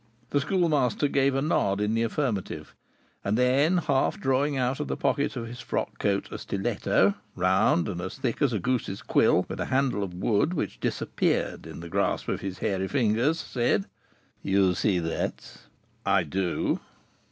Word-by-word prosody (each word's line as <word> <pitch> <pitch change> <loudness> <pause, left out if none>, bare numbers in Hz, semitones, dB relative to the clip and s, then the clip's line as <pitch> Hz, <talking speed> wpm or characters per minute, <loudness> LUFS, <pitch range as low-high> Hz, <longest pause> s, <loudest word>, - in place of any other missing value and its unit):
The 145 - +2
Schoolmaster 150 - +2
gave 140 -1 +2
a 135 - +1
nod 100 - +1
in 105 +1 0
the 115 - +1
affirmative, 115 -4 -2 0.5
and 100 +2 0
then, 135 +8 +3
half 140 -6 +1
drawing 135 +2 +1
out 130 +1 0
of 150 - -2
the - - -2
pocket 140 - 0
of 120 -2 -4
his 120 +2 -8
frock - - -3
coat 100 -1 0
a - - -5
stiletto, 95 -1 +1 0.2
round 90 -1 +3
and 90 -4 -4
as 95 - -6
thick 130 -1 -2
as 140 -4 +3
a 110 - 0
goose's 115 -2 -2
quill, - - +3
with - - -6
a - - -1
handle 130 -6 +1
of 90 -3 -5
wood 105 - +1
which - - -3
disappeared - - -1
in - - -8
the 85 - -7
grasp - - 0
of - - -2
his 95 -1 -4
hairy 95 -1 -1
fingers, 125 +5 +1
said: 120 -7 0 0.6
"You 95 -1 +3
see 95 +2 +1
that?" 80 -1 -3 0.5
"I 95 -1 +3
do." 90 +3 -1
115 Hz, 175 wpm, -27 LUFS, 95-135 Hz, 0.6 s, then